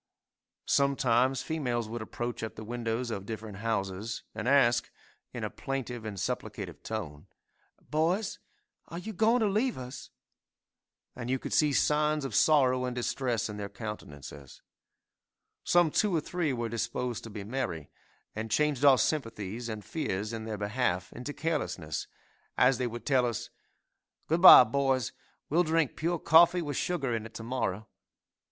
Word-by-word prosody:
Sometimes 130 -2 +2
females 125 -8 -2
would 115 +1 -5
approach 120 +2 -5
at 110 - -5
the 110 - -8
windows 115 +1 -3
of 100 -2 -5
different 110 -3 -6
houses 105 0 -3
and 110 - -4
ask, 125 -4 +4 0.4
in - - -6
a - - -1
plaintive 125 -4 -5
and 105 -2 -5
supplicative - - -4
tone, 90 -7 -6 0.6
"Boys, 170 - 0 0.5
are 170 - -7
you 215 +5 -6
going 225 +5 +3
to - - +3
leave 220 +6 0
us?" 130 +1 -8 1.1
And 125 -1 -6
you 130 - +1
could - - -6
see 150 -2 +4
signs 150 +1 +2
of 130 - -5
sorrow 130 -2 +4
and 125 -1 -3
distress 120 -2 -1
in 105 -1 -7
their 100 -1 -5
countenances. 75 - -9 1.0
Some 175 -3 +4
two 205 0 +2
or 160 - +1
three 170 -1 -1
were 120 -2 -2
disposed 115 +1 -3
to - - -8
be 105 -2 -7
merry, 105 - -4 0.4
and 110 +1 -4
changed 145 +3 +1
our 140 -2 +7
sympathies 115 -4 -2
and 110 -2 -6
fears 105 -8 -3
in 110 -1 -5
their 110 -1 -4
behalf 100 -3 -1
into 125 +4 -6
carelessness, 145 - -3 0.5
as 125 0 +4
they 125 - 0
would 120 0 -7
tell 130 -3 +3
us, 115 - -4 0.7
"Good 165 +2 0
bye, 180 - +12
boys, 130 0 0 0.4
we'll 165 +4 +3
drink 160 -4 +1
pure 170 +2 -1
coffee 170 +3 +5
with 145 -3 -4
sugar 140 -9 -1
in 115 0 -4
it 115 - -21
to 115 - -6
morrow! 110 -4 -2
125 Hz, 160 wpm, -29 LUFS, 110-150 Hz, 1.1 s, bye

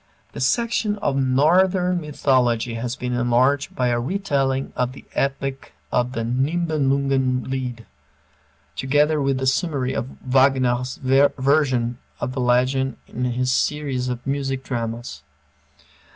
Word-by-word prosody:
The - - -8
section 220 - +1
on 135 -8 0
Northern 180 +4 +3
Mythology 125 -6 +1
has 120 +2 -3
been 125 -1 -4
enlarged 125 +3 +1
by 125 -1 +1
a 120 0 +1
retelling 135 -4 -1
of 125 0 -1
the - - -13
epic 135 0 -2 0.2
of 125 0 0
the 115 - -2
"Nibelungen 135 -1 +1
Lied," 125 -3 -4 0.9
together 145 - +2
with 135 -1 +1
a - - 0
summary 135 -2 0
of 130 - -4
Wagner's 130 -1 +2
version 135 -2 +2 0.2
of 125 - -2
the 130 - -2
legend 130 +1 +1
in 125 - -3
his 125 +1 0
series 135 -2 0
of 125 -1 -5
music 135 -1 -2
dramas. 115 - -4
130 Hz, 125 wpm, -22 LUFS, 125-140 Hz, 0.9 s, Northern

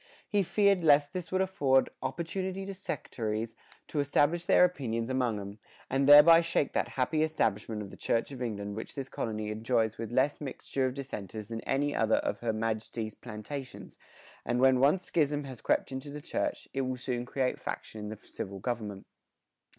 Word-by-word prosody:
He 205 - +2
feared 200 -1 +3
lest 145 -2 +5
this 180 -2 -5
would 185 0 +2
afford 140 -8 +2
"opportunity 185 +3 -3
to 195 - -5
Sectarys 115 - -3 0.3
to 150 - -2
establish 145 +4 +2
their - - +7
opinions 120 -9 -2
among 125 -5 0
'em, 100 +1 -8 0.3
and 135 +1 +2
thereby 160 +3 +10
shake 165 -4 0
that - - +1
happy 155 +4 +1
establishment 110 -8 0
of 100 - -9
the - - -11
Church 115 +4 0
of 130 -2 -8
England 100 -4 -3
which 110 - -6
this 135 -2 -4
colony 110 -4 -3
enjoys 110 0 0
with 115 -1 -4
less 135 +5 +1
mixture 135 -1 -2
of 130 - -4
Dissenters 110 -6 -6
than 115 -1 -4
any 145 +2 +1
other 110 0 +3
of - - -1
her 115 -1 0
Maj'tie's 110 0 -3
plantations, 125 +4 -8 0.4
and 120 0 0
when 130 0 +5
once 150 +8 +4
Schism 145 -4 +1
has 130 -4 -8
crept - - +1
into 130 +2 -5
the 145 +1 -6
Church, 150 - -3
it 135 - 0
will 130 -1 -2
soon 125 -1 -2
create 130 +1 -1
faction 110 - -6
in 105 - -5
the 110 - -6
Civil 100 -1 -7
Government." 105 -2 -4
130 Hz, 180 wpm, -30 LUFS, 110-145 Hz, 0.4 s, thereby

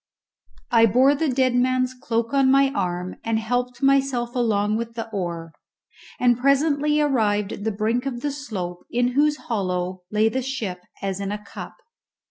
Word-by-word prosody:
I 230 -1 +6
bore 255 +7 +4
the 295 +1 0
dead 255 -1 +2
man's 255 +1 +1
cloak 230 -1 -2
on 270 -1 +4
my 275 0 +4
arm 180 -7 -3
and 225 -1 0
helped 245 +3 -2
myself 270 -3 +2
along 215 -3 +1
with 230 0 -5
the 225 -1 -4
oar, 170 -5 -4 0.7
and 245 -1 +3
presently 285 +2 +2
arrived 215 -8 +1
at - - -7
the 220 - +1
brink 225 +5 -1
of 240 -3 -4
the 290 - -1
slope 195 -11 -5
in 245 +1 +1
whose 295 +3 +2
hollow 185 -6 -3
lay 215 +1 +2
the 260 +4 -1
ship 225 -9 -4 0.2
as 195 -1 -2
in 200 0 -3
a 210 - -2
cup. 210 - -10
240 Hz, 170 wpm, -23 LUFS, 205-270 Hz, 0.7 s, I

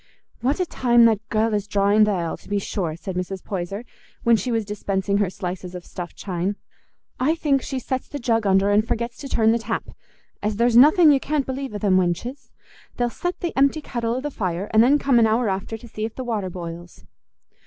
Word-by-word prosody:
"What 275 +7 0
a 365 - +2
time 240 -7 +4
that 220 -3 +4
gell 220 0 +1
is 205 -1 -1
drawing 205 +1 +4
th' - - -4
ale, 175 -5 -1
to - - -17
be 205 - 0
sure!" 180 -5 -2
said 185 +2 -6
Mrs. 185 +1 -4
Poyser, 195 +4 -4 0.4
when 235 0 +5
she 245 +3 -2
was 225 -2 0
dispensing 200 -1 -1
her 200 -3 +1
slices 180 0 -6
of 180 - -8
stuffed 175 -1 -7
chine. 185 +1 -3 0.6
"I 300 +6 +2
think 285 -4 +1
she 265 - -4
sets 260 0 -3
the 290 - -6
jug 230 -5 0
under 195 +1 +3
and 210 +1 +4
forgets 235 +1 -3
to 275 - -7
turn 220 -3 +3
the 235 - +1
tap, 225 0 -4 0.5
as 210 0 -1
there's 235 +2 +2
nothing 305 +6 +7
you 275 - +4
can't 290 0 -1
believe 265 -3 -4
o' - - -1
them 195 -2 +2
wenches: 185 +10 -2 0.5
they'll 240 -1 0
set 355 +7 -4
the 345 - -3
empty 280 +3 +3
kettle 235 -5 -3
o' 255 - -2
the 295 +1 -4
fire, 185 -4 -3
and 220 - +6
then 265 +5 +5
come 275 -4 +3
an 225 - +5
hour 225 +2 +1
after 195 +3 -3
to 240 - -13
see 215 -1 -6
if 220 0 -4
the 260 - -4
water 215 -6 -2
boils." 170 -1 -8
220 Hz, 225 wpm, -23 LUFS, 195-250 Hz, 0.6 s, nothing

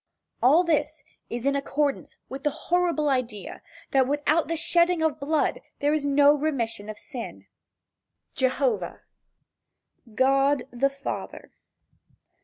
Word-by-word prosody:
All 295 +8 +5
this 305 -2 -1 0.3
is 240 +1 -4
in 280 0 +2
accordance 280 0 -2
with 270 +1 -8
the 295 - +2
horrible 340 0 0
idea 250 -7 -2 0.3
that 265 -2 +3
without 295 +3 +1
the 330 - -1
shedding 340 +1 +2
of 315 -1 0
blood 300 +2 0 0.2
there 290 0 +1
is 295 -2 0
no 285 +1 +5
remission 240 -8 -2
of 215 - -6
sin. 250 -2 -8
III. - - -31 1.0
JEHOVAH. 245 -9 -1 1.1
GOD 275 +1 +3
the 255 +3 +1
Father. 275 0 -7
285 Hz, 125 wpm, -26 LUFS, 260-310 Hz, 1.1 s, All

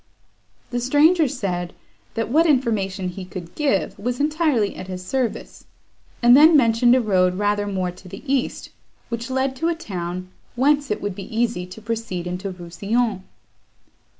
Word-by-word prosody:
The 245 - -1
stranger 295 +6 +4
said, 180 -9 -3 0.4
that 225 -1 -2
what 325 +5 +4
information 205 - +1
he 185 +1 -7
could 180 -2 -8
give 275 -11 0
was 245 +5 -2
entirely 295 - +1
at 185 - -8
his 185 -1 -6
service; 255 +2 -3 0.6
and 240 +1 +8
then 310 +3 +8
mentioned 240 -1 +4
a - - +4
road 185 -4 +2
rather 205 0 0
more 185 -2 -1
to 180 +1 -15
the 195 +2 -10
east, 270 -2 -1 0.4
which 235 +1 -4
led 265 0 0
to 325 - 0
a 340 - +1
town, 185 - -5 0.3
whence 285 +3 +2
it 210 - -2
would 205 -1 -2
be 195 0 -8
easy 230 -6 0
to 185 +4 -11
proceed 225 -6 -3
into 180 +3 -4
Rousillon. 195 +5 -2
220 Hz, 160 wpm, -22 LUFS, 185-260 Hz, 0.6 s, and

